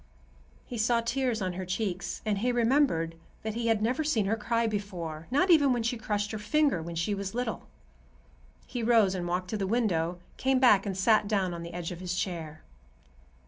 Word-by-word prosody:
He 240 - -6
saw 230 +1 +3
tears 235 -2 -1
on 185 -1 -2
her 185 +1 -4
cheeks, 185 0 -3
and 210 -2 0
he 245 +4 +1
remembered 235 - +2 0.3
that 220 0 -3
he 230 +1 -2
had 220 -2 +2
never 250 +7 +1
seen 240 -9 +1
her 210 +3 +1
cry 230 +1 0
before, 180 -7 -4
not 355 +9 +3
even 290 -5 +6
when 240 -2 -1
she 235 +2 0
crushed 210 -2 -2
her 220 - -4
finger 275 - +2
when 170 +1 -6
she 170 +5 0
was 200 +1 -4
little. 245 -2 -3 1.0
He 245 - -4
rose 225 -4 +4
and 180 -2 -3
walked 180 +1 -2
to 215 - -1
the 195 -2 -2
window, 180 -7 0 0.2
came 265 0 +2
back 215 -6 +5
and 190 -2 -3
sat 215 +1 +3
down 195 -4 0
on 170 - -6
the 170 0 -8
edge 175 -1 -4
of 175 - -7
his 180 -1 -3
chair. 165 -4 -4
210 Hz, 205 wpm, -29 LUFS, 180-235 Hz, 1.0 s, even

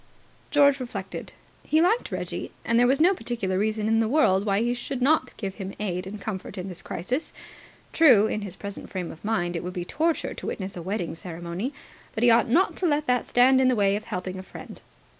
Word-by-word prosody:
George 285 -2 +4
reflected. 250 -2 -6 0.3
He 310 - +2
liked 395 +9 +2
Reggie, - - -4
and 230 0 +3
there 245 - +5
was 270 +2 +3
no 355 +5 +5
particular 205 - -2
reason 215 +1 0
in 225 0 +3
the 225 - +2
world 215 -8 +3
why 200 +1 +2
he 240 +1 +1
should 245 +2 -5
not 310 +5 +2
give 195 -3 -4
him 190 +1 -6
aid 185 -3 -3
and 205 +2 -7
comfort 200 -1 -6
in 185 +1 -5
this 180 - -8
crisis. 250 - -3 0.6
True, 255 -11 +6
in 215 - -2
his 195 -3 -7
present 200 -1 -7
frame 185 -3 -4
of 160 - -14
mind, 175 -5 -1
it 170 - -3
would 180 +1 -5
be 175 -2 -4
torture 325 - -1
to - - -7
witness 190 -1 -4
a 175 - -6
wedding 185 0 -3
ceremony; 175 - -5 0.4
but 220 - -1
he 240 - +7
ought 230 0 +4
not 340 +10 +3
to 365 - +1
let 300 -1 +1
that 250 -2 +1
stand 260 +2 +5
in 260 - +4
the 255 - +3
way 200 -2 +3
of 210 - -5
helping 185 +1 -4
a - - -5
friend. 190 - -11
215 Hz, 225 wpm, -26 LUFS, 190-260 Hz, 0.6 s, he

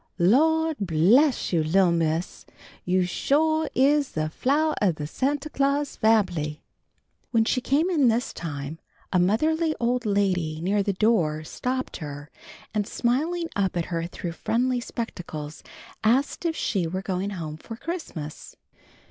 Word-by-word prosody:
"Lawd 320 - +3
bless 200 - +3
you, 165 -2 +3
li'l' 175 +3 +3
Miss, 165 0 -1 0.4
you 185 +1 +2
sho' 315 - +1
is 280 +1 +3
the 155 0 -2
flowah 300 - +1
of 185 -6 +3
the 150 - -5
Santa 275 - -1
Claus 280 0 0
fambly!" 175 -9 +1 0.7
When 225 -2 +3
she 255 - +1
came 290 +7 +2
in 310 -8 +3
this 235 +1 +1
time, 150 -1 -6 0.3
a 180 - +4
motherly 310 - +2
old 245 +1 +1
lady 180 -6 0
near 195 +5 +1
the 200 0 0
door 180 -7 +1
stopped 255 +10 -3
her, 145 -1 -8 0.4
and 210 -2 0
smiling 320 +8 0
up 190 -3 0
at 170 - 0
her 165 0 -1
through 175 0 -5
friendly 245 +8 0
spectacles, 170 -11 -6 0.4
asked 260 +9 +1
if 330 -1 0
she 185 - 0
were 185 +3 -4
going 190 +1 -2
home 160 -6 -5
for 225 +7 -9
Christmas. 225 - -6
205 Hz, 145 wpm, -25 LUFS, 170-275 Hz, 0.7 s, a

